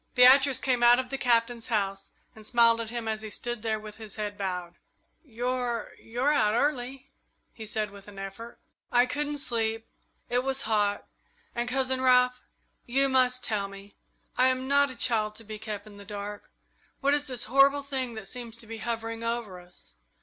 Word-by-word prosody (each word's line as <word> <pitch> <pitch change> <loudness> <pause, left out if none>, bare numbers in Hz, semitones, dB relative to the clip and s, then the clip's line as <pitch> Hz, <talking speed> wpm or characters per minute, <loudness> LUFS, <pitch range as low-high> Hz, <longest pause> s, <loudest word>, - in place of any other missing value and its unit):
Beatrice 265 +2 +7
came 255 -3 +1
out 240 0 +7
of 255 0 -4
the 270 - -1
Captain's 235 -1 +2
house 195 -4 -1 0.3
and 220 - -13
smiled 230 0 +4
at 225 - -4
him 235 -1 -4
as 220 -1 -2
he 215 - -6
stood 240 +2 -4
there 220 -1 -1
with 215 -1 -10
his 215 -3 -9
head 210 -1 -4
bowed. 180 -3 -4 0.4
"You're 245 -3 -2
you're 250 +6 0
out 215 -6 +3
early," 270 0 -1 0.4
he 220 -2 -9
said, 215 -1 -2
with 200 0 -13
an 205 -1 -12
effort. 195 +5 -8 0.3
"I 245 0 +5
couldn't 295 +2 -2
sleep. 225 -4 -1 0.4
It 245 +1 0
was 270 0 -1
hot, 205 -2 +1 0.5
and 240 +1 -2
Cousin 260 0 0
Ralph, 250 -1 +4 0.5
you 270 +3 +2
must 255 -1 +3
tell 205 -3 -1
me. 195 +1 -12 0.4
I 255 - +6
am 260 0 0
not 280 0 +4
a 260 - -6
child, 215 -3 +1
to 225 - -10
be 215 0 -8
kept 210 -2 -5
in 210 -1 -13
the 200 - -11
dark. 205 0 -7 0.5
What 280 +1 +3
is 290 0 0
this 250 -3 -3
horrible 275 +3 +4
thing 260 -4 -3
that 220 -3 -6
seems 235 +1 -5
to 235 - -8
be 225 0 -7
hovering 230 0 -4
over 230 -5 -3
us? 180 0 -11
235 Hz, 190 wpm, -28 LUFS, 215-255 Hz, 0.5 s, Beatrice